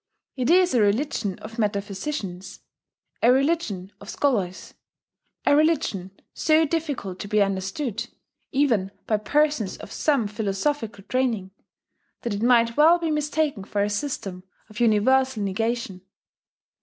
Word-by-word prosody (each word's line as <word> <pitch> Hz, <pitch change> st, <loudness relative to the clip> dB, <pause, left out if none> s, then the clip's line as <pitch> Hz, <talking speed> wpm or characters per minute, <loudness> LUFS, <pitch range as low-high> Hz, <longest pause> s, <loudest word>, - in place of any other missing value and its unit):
It 255 Hz, -2 st, -1 dB
is 360 Hz, -1 st, +5 dB
a 240 Hz, -, +4 dB
religion 210 Hz, -2 st, 0 dB
of 225 Hz, +2 st, -8 dB
metaphysicians, 200 Hz, -1 st, -3 dB, 0.6 s
a 235 Hz, -, +6 dB
religion 260 Hz, -, 0 dB
of 200 Hz, -, -10 dB
scholars, 200 Hz, -10 st, -1 dB, 0.7 s
a -, -, +5 dB
religion 295 Hz, -, +1 dB, 0.2 s
so 315 Hz, 0 st, +3 dB
difficult 285 Hz, -, -3 dB
to 205 Hz, -, -5 dB
be 210 Hz, +1 st, +1 dB
understood, 200 Hz, +5 st, -1 dB, 0.4 s
even 245 Hz, -9 st, +2 dB, 0.2 s
by 215 Hz, -, +1 dB
persons 290 Hz, -2 st, +1 dB
of -, -, -11 dB
some 280 Hz, -7 st, +1 dB
philosophical 210 Hz, +2 st, -2 dB
training, 230 Hz, -6 st, -1 dB, 0.7 s
that 235 Hz, -4 st, -2 dB
it 200 Hz, -, -3 dB
might 235 Hz, -1 st, +4 dB
well 320 Hz, +3 st, +7 dB
be 335 Hz, -2 st, -2 dB
mistaken 300 Hz, -6 st, 0 dB
for 200 Hz, 0 st, -1 dB
a 205 Hz, -, -1 dB
system 205 Hz, -6 st, -4 dB, 0.3 s
of 215 Hz, -, -9 dB
universal 240 Hz, +1 st, +3 dB
negation. 210 Hz, -1 st, -2 dB
230 Hz, 130 wpm, -24 LUFS, 200-290 Hz, 0.7 s, well